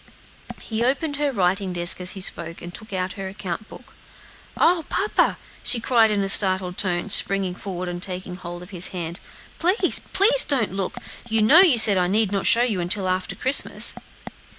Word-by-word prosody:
He 225 0 -3
opened 285 +4 -2
her 290 -1 -1
writing 190 -3 -1
desk 175 +1 -2
as 180 +1 -4
he 195 - -8
spoke, 170 -2 -3
and 175 0 -9
took 215 +3 -12
out 185 0 -4
her 195 -1 -7
account 190 +1 -7
book. - - -15 0.6
"Oh! 340 -1 +2
papa," 415 +2 0 0.3
she 245 - +4
cried 230 -1 +2
in 205 -2 -1
a - - -3
startled 185 -2 +4
tone, 185 +1 -2
springing 195 -2 +3
forward 185 -1 -7
and 175 0 -6
taking 185 -1 -7
hold 175 -1 -10
of 180 - -14
his 180 -1 -2
hand, 170 -1 -7 0.4
"please, 365 +6 +2
please 480 +6 +3
don't 245 -9 -1
look! 195 -1 -4 0.3
you 220 -1 +1
know 285 +11 +6
you 345 -10 +5
said 205 -4 +7
I 180 - 0
need 205 +1 0
not 195 -1 -1
show 235 - +5
you 220 -7 -2
until 185 +2 -2
after 185 0 -3
Christmas." 265 +2 +2
195 Hz, 190 wpm, -21 LUFS, 180-230 Hz, 0.6 s, said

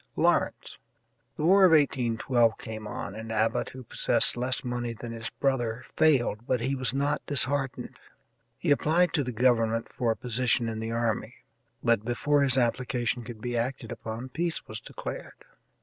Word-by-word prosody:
Lawrence. - - 0 0.6
The - - -3
war 190 +4 +6
of 180 -3 +7
1812 120 -5 +2
came 110 -1 -7
on, - - -5
and 110 +1 -7
Abbott, 110 0 +1
who 130 0 -10
possessed - - +2
less 125 +1 -1
money 120 -1 -3
than 115 +1 -8
his 115 0 -5
brother, 120 -4 -1
failed, 120 -7 +2
but 125 -2 +1
he 130 +3 0
was 130 -2 +2
not 145 +2 -1
disheartened. 140 -1 0 0.6
He - - -1
applied 160 +5 +3
to 145 - +2
the 125 - -4
government 115 -1 +1
for 120 -2 -1
a 115 - +2
position 120 0 +1
in 110 -1 -4
the 110 0 -4
army, 115 -1 -1 0.5
but 115 -2 +3
before 130 +5 +1
his 135 -1 +2
application 125 0 0
could 115 -2 -9
be 120 0 -3
acted 125 +2 -3
upon 115 +2 -6
peace 170 +5 -3
was 110 0 -5
declared. - - -7
120 Hz, 165 wpm, -28 LUFS, 115-135 Hz, 0.6 s, of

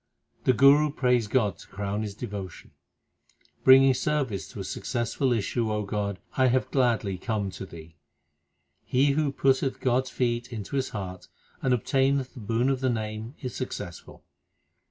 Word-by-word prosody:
The 130 - +5
Guru 140 +4 +6
prays 125 -5 +1
God 105 -4 +1
to - - -13
crown 100 +1 -3
his 105 -2 -5
devotion: 100 -5 -7 0.9
Bringing 135 0 +8
service 130 -7 -1
to 115 - -10
a - - -3
successful 120 +6 -1
issue, 115 0 0
O 105 0 -1
God, 100 -1 -2 0.2
I 130 -1 +4
have 130 +1 +1
gladly 115 -8 +1
come 105 -2 -2
to 95 0 -8
Thee. 80 -1 -12 0.9
He 135 +3 +2
who 145 0 +1
putteth 135 -1 +1
God 130 0 +1
s - - -7
feet 120 -1 -1
into 110 +2 -5
his 135 -1 0
heart 95 -3 -6 0.3
and 130 - +1
obtaineth 135 +2 +1
the - - -10
boon 115 +4 0
of 135 -1 0
the 130 - +2
Name 110 +2 -4
is 125 - -4
successful. 105 -8 -7
120 Hz, 160 wpm, -27 LUFS, 105-130 Hz, 0.9 s, Bringing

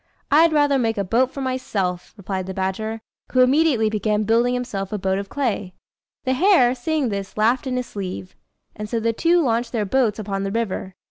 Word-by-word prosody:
I'd 320 +3 +6
rather 290 -2 +3
make 225 -3 0
a 200 - 0
boat 240 +7 +2
for 275 - -7
myself," 205 -9 -3
replied 190 -1 -4
the 190 - -5
badger, 215 +4 -3 0.3
who 255 - +4
immediately 260 -3 +3
began 215 0 0
building 235 +3 +2
himself 210 -6 -4
a 210 - -1
boat 190 0 0
of 200 0 -6
clay. 210 -9 -2 0.5
The 260 - +1
hare, 260 -5 +4
seeing 275 +1 -1
this, 200 -1 -5
laughed 235 +5 +2
in 255 -1 -1
his 250 - -2
sleeve; 185 -3 -6 0.4
and 210 0 -6
so 230 - -1
the 230 +1 0
two 340 +7 +3
launched 235 -1 0
their 220 -3 0
boats 225 0 +1
upon 195 -2 -3
the 195 0 -2
river. 195 -4 -3
225 Hz, 200 wpm, -22 LUFS, 200-255 Hz, 0.5 s, I'd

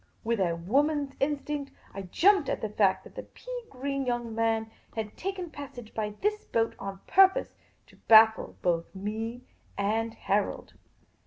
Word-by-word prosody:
With 230 -1 0
a 175 -3 +1
woman's 280 - +1
instinct, 290 0 -2 0.2
I 195 - -5
jumped 325 - +3
at - - -2
the 220 - -2
fact 190 -2 +2
that - - -14
the - - -6
pea - - -8
green 275 +1 -3
young 240 -2 -2
man 225 0 0 0.2
had 220 -2 -4
taken 370 -3 -4
passage 270 -6 -9
by 210 -1 -3
this 425 +1 0
boat, 225 0 0
on 195 0 -6
pur 385 0 +7
pose 380 - -5 0.3
to - - -21
baffle 220 0 +6
both 170 +1 0
me 220 +5 -4 0.3
and 220 +3 0
Harold. 200 +1 -1
230 Hz, 160 wpm, -28 LUFS, 210-285 Hz, 0.3 s, pur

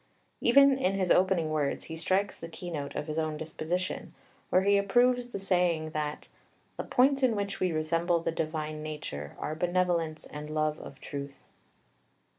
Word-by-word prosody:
Even 275 +2 +6
in 195 -5 +1
his 185 -2 +1
opening 180 -4 +3
words 150 -2 0
he 160 - -7
strikes 190 +4 0
the 165 - -8
keynote 165 -4 -5
of - - -2
his 155 +1 -2
own 155 -1 -1
disposition, 160 +4 -3 0.3
where 185 - +4
he 200 +1 +4
approves 245 +5 +3
the 240 - -5
saying 175 -5 +1
that 150 -1 -3 0.5
"the - - -4
points 270 +2 +3
in 250 -4 +3
which 200 -1 -3
we 185 - +1
resemble 165 +2 +1
the 165 0 -1
divine 155 -1 -3
nature 150 - -6
are 155 - -3
benevolence 170 -2 0
and 150 0 -8
love 155 0 0
of - - -10
truth." 140 -1 -6
165 Hz, 165 wpm, -29 LUFS, 155-195 Hz, 0.5 s, Even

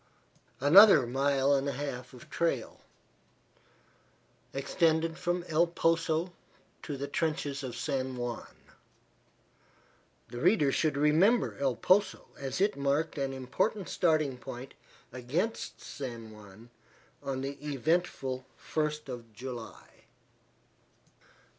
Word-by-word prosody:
Another 160 - +8
mile 135 +2 +2
and 140 0 +1
a - - -2
half 125 -2 -5
of 125 - -13
trail 150 -9 -1 1.7
extended 160 +3 +1
from 175 0 -2
El 165 +2 +3
Poso 165 +1 0 0.5
to 145 -3 -5
the 140 +1 -4
trenches 145 -2 -2
of 130 -3 -5
San 130 0 -2
Juan. 120 -1 -4 1.8
The 120 0 -6
reader 170 -6 +4
should 150 0 +1
remember 165 +11 +3
El 135 -3 +1
Poso, 190 - +2
as 135 +2 -4
it 205 +2 +2
marked 140 +3 0
an 135 -1 -1
important 140 - -1
starting 155 -7 +1
point 125 +2 -8 0.4
against 150 - -3
San 120 -5 -7
Juan 105 +2 -14 0.5
on 135 -1 -3
the 140 +1 -6
eventful 145 -3 -1
first 150 -1 -2
of 120 -3 -8
July. 120 -1 -9
140 Hz, 110 wpm, -30 LUFS, 130-165 Hz, 1.8 s, Another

